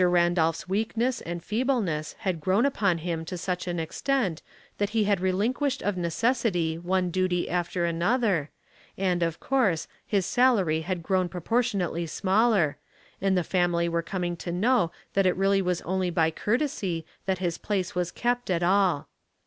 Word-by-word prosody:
Randolph's 175 -2 +2
weakness 225 +5 0
and 170 0 -5
feebleness 215 - -1
had 185 -6 -1
grown 190 - +2
upon 200 -10 +1
him 165 -1 -3
to 180 +2 -5
such 180 +1 -3
an 175 -1 -2
extent 190 - -1 0.4
that 205 -1 +1
he 215 - +4
had 205 -2 +2
relinquished 240 +10 0
of 205 -1 0
necessity 180 -1 0
one 180 +1 0
duty 185 -1 0
after 175 0 -1
another, 170 - +1 0.5
and, 180 -2 0
of 165 -1 -1
course, 230 -12 +1 0.2
his 195 -4 0
salary 195 -9 +3
had 175 0 -3
grown 185 +1 +1
proportion 215 +4 0
ately 170 -1 -2
smaller, 195 -4 +2 0.4
and 195 -1 +2
the 180 - +2
family 175 -1 +1
were 170 0 0
coming 175 0 -3
to 170 - -5
know 195 0 +2 0.2
that 195 -1 +3
it 180 - +1
was 195 -2 +2
only 185 +1 0
by 165 -2 +2
courtesy 205 - -1 0.2
that 190 -1 +1
his 175 -2 -2
place 195 -4 -2
was 180 -1 -1
kept 245 +2 -1
at 175 -1 +1
all. 185 -4 +2
185 Hz, 160 wpm, -27 LUFS, 170-210 Hz, 0.5 s, he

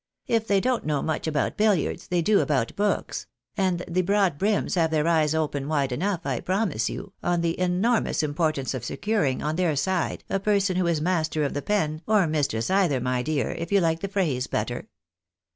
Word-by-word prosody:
" - - -48
If 225 0 -4
they 200 -1 +3
don't 250 +3 0
know 150 -2 0
much 160 0 -2
about 150 -2 -1
billiards, 210 -7 +1
they 175 -1 0
do 210 +3 +4
about 130 -7 0
books; 205 0 -1 0.3
and 185 -4 0
the 180 +1 +1
broad 195 -5 +1
brims 205 +1 +1
have 165 -3 +2
their 155 0 +1
eyes 160 -2 +3
open 145 -3 -1
wide 145 -4 0
enough, 180 +7 -1
I - - -1
promise 185 - 0
you, 195 - -7
on 175 -1 +1
the 170 0 -1
enormous 185 +1 +1
importance 150 -3 -1
of 130 -3 -4
securing 155 - -1
on 155 +2 -1
their 175 -4 +1
side 175 +5 -1
a 195 - -1
person 200 -2 +1
who 180 -1 +1
is 165 -3 +1
master 160 -3 0
of 140 - -1
the 145 - -2
pen, 155 -4 -1
or 210 -4 +4
mistress 145 -5 -1
either, 185 -9 +3
my 125 0 0
dear, 140 -2 -1
if 170 +2 -5
you 200 - +5
like 165 -2 +1
the 195 - -3
phrase 160 -11 -1
better." - - -3
170 Hz, 205 wpm, -25 LUFS, 150-195 Hz, 0.3 s, you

